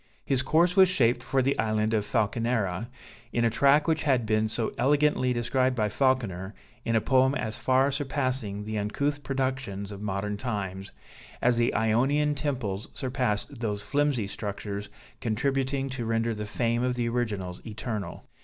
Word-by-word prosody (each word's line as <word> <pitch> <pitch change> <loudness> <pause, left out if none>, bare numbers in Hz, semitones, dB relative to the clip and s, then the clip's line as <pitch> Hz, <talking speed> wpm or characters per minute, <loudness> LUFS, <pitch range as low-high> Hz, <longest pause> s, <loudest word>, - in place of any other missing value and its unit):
His 135 -2 +1
course 170 +6 +3
was 190 -2 +7
shaped 125 -9 +2
for 135 -1 +1
the 135 +2 +2
island 110 0 +1
of 105 -2 +2
Falconera, 110 -3 0 0.4
in 120 0 +1
a 115 - +3
track 140 +6 +4
which 160 -2 +2
has 135 -4 +2
been 110 -1 +1
so 110 +1 -2
elegantly 145 -2 +2
described 130 +2 +1
by 105 -3 +1
Falconer, 105 -7 0 0.3
in 115 - 0
a 110 - +4
poem 130 +2 +3
as 110 -4 -3
far 130 +2 +3
surpassing 130 -7 -2
the 110 0 -3
uncouth 140 +8 -1
productions 130 -7 -2
of 100 0 -8
modern 105 0 -2
times, 100 -4 -4 0.5
as 120 -1 +3
the 120 0 +3
Ionian 130 +7 +2
temples 130 -9 -3
surpassed 125 -2 -2
those 105 -3 -2
flimsy 140 0 +1
structures 100 0 -5 0.3
contributing 135 +4 0
to 130 -2 -4
render 115 +1 0
the 105 -1 -5
fame 115 +2 0
of 125 0 0
the 120 -1 -1
originals 105 -7 -2
eternal. 110 -2 -5
120 Hz, 160 wpm, -27 LUFS, 105-135 Hz, 0.5 s, was